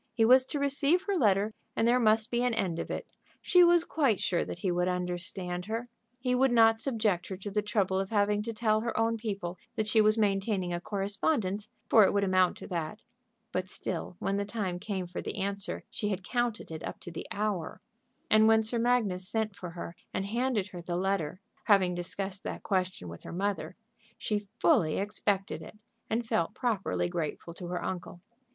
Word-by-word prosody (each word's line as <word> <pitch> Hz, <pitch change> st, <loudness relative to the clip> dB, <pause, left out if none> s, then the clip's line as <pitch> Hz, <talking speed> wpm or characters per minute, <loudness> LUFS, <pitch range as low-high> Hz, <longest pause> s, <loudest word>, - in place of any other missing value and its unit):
He 225 Hz, -2 st, +4 dB
was 255 Hz, +2 st, +7 dB
to -, -, -2 dB
receive 285 Hz, +5 st, +2 dB
her 400 Hz, 0 st, -1 dB
letter, 210 Hz, -, +3 dB, 0.2 s
and 225 Hz, -, +2 dB
there 245 Hz, +1 st, +4 dB
must 220 Hz, -1 st, +3 dB
be 240 Hz, 0 st, +1 dB
an 245 Hz, -2 st, +1 dB
end 185 Hz, -6 st, -1 dB
of -, -, -4 dB
it. -, -, -3 dB, 0.3 s
She 360 Hz, -1 st, +5 dB
was 345 Hz, -1 st, +6 dB
quite 275 Hz, -, +1 dB
sure 175 Hz, -, +1 dB
that -, -, -6 dB
he 180 Hz, +1 st, -1 dB
would 180 Hz, +1 st, +1 dB
understand 180 Hz, 0 st, -2 dB
her. 225 Hz, +2 st, -2 dB, 0.3 s
He 250 Hz, 0 st, 0 dB
would 265 Hz, +2 st, +4 dB
not 225 Hz, -2 st, +5 dB
subject 220 Hz, -7 st, 0 dB
her 190 Hz, -, -5 dB
to 200 Hz, +2 st, -6 dB
the 210 Hz, +1 st, +1 dB
trouble 200 Hz, -3 st, +1 dB
of 195 Hz, 0 st, -2 dB
having 205 Hz, -1 st, +2 dB
to 230 Hz, +2 st, -3 dB
tell 215 Hz, -1 st, +1 dB
her 230 Hz, -1 st, -2 dB
own 230 Hz, 0 st, +2 dB
people 195 Hz, -5 st, -4 dB, 0.2 s
that 215 Hz, -, 0 dB
she 215 Hz, +1 st, +4 dB
was 215 Hz, +1 st, +4 dB
maintaining 195 Hz, -3 st, +1 dB
a 175 Hz, -, -2 dB
correspondence, 200 Hz, -, -1 dB, 0.2 s
for 220 Hz, -, +7 dB
it -, -, +3 dB
would 200 Hz, 0 st, +2 dB
amount 185 Hz, -2 st, +3 dB
to -, -, -9 dB
that. 170 Hz, +2 st, -4 dB, 0.5 s
But 185 Hz, 0 st, -2 dB
still 180 Hz, -, -4 dB
when 195 Hz, +2 st, -1 dB
the 200 Hz, -, 0 dB
time 200 Hz, -4 st, -3 dB
came 190 Hz, -1 st, -3 dB
for 175 Hz, +1 st, -5 dB
the -, -, -5 dB
answer 200 Hz, 0 st, -2 dB
she 210 Hz, -, -2 dB
had 195 Hz, -2 st, -2 dB
counted 240 Hz, -3 st, -1 dB
it 160 Hz, 0 st, -6 dB
up -, -, -6 dB
to 175 Hz, -, -8 dB
the 165 Hz, -, -7 dB
hour. 205 Hz, -5 st, -2 dB, 0.5 s
And 215 Hz, 0 st, +6 dB
when 220 Hz, 0 st, +5 dB
Sir 230 Hz, +2 st, +1 dB
Magnus 220 Hz, -7 st, +1 dB
sent 220 Hz, -3 st, -1 dB
for 180 Hz, -3 st, -7 dB
her 170 Hz, 0 st, -7 dB, 0.2 s
and 195 Hz, -, -2 dB
handed 235 Hz, -1 st, 0 dB
to 190 Hz, -3 st, -10 dB
her -, -, -6 dB
the 175 Hz, 0 st, -3 dB
letter, 185 Hz, -2 st, -1 dB, 0.2 s
having 195 Hz, -4 st, +4 dB
discussed 190 Hz, +2 st, -4 dB
that -, -, -6 dB
question 185 Hz, -, -1 dB
with 85 Hz, 0 st, -8 dB
her -, -, -8 dB
mother, 195 Hz, +1 st, -2 dB, 0.4 s
she 205 Hz, -1 st, -2 dB
fully 230 Hz, -, +3 dB
expected 200 Hz, 0 st, -1 dB
it, -, -, -11 dB, 0.3 s
and 230 Hz, +2 st, 0 dB
felt 170 Hz, -6 st, 0 dB
properly 220 Hz, -7 st, 0 dB
grateful 170 Hz, -1 st, -4 dB
to 175 Hz, +1 st, -7 dB
her 180 Hz, 0 st, -3 dB
uncle. 180 Hz, -1 st, -5 dB
205 Hz, 205 wpm, -30 LUFS, 185-225 Hz, 0.5 s, was